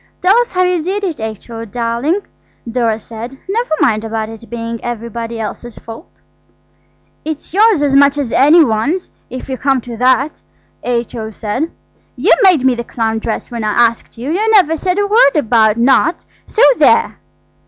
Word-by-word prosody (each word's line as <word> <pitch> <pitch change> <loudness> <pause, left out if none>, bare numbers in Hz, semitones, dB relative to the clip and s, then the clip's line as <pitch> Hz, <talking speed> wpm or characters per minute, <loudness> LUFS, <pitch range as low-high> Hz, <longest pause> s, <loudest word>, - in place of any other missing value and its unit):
"Tell 375 +3 +3
us 485 - -2
how 365 0 +2
you 360 -2 +1
did 390 +5 -3
it, 335 - -3
H.O. 220 +1 -6
dear," 235 +3 -3 0.6
Dora 230 -2 0
said; 230 +4 -9
"never 460 +5 -2
mind 215 -5 +2
about 220 -1 -3
it 225 +1 -12
being 230 -1 -5
everybody 235 -1 -5
else's 225 +2 -6
fault." 230 +9 -11 1.1
"It's 310 0 -6
yours 415 -5 +4
as 280 -2 +1
much 280 +1 +5
as 275 -5 -2
any 310 +5 +6
one's, 280 +11 -1 0.2
if 255 - -7
you 260 -1 -5
come 270 -1 +1
to 235 -1 -8
that," 260 +4 +1 0.4
H.O. 235 -2 -3
said. 220 +8 -3 0.5
"You - - +3
made 360 -10 +4
me 260 - +4
the 235 0 -4
clown 225 -1 -2
dress 220 +2 -4
when 235 -2 -4
I 210 -1 0
asked 230 0 +1
you. 255 +6 -4
You 420 +6 0
never 375 -8 +4
said 365 +4 -2
a 410 - +2
word 410 - +4
about 225 -6 +3
not. 265 +7 +2 0.2
So 460 - +1
there!" - - +3
245 Hz, 175 wpm, -15 LUFS, 230-320 Hz, 1.1 s, any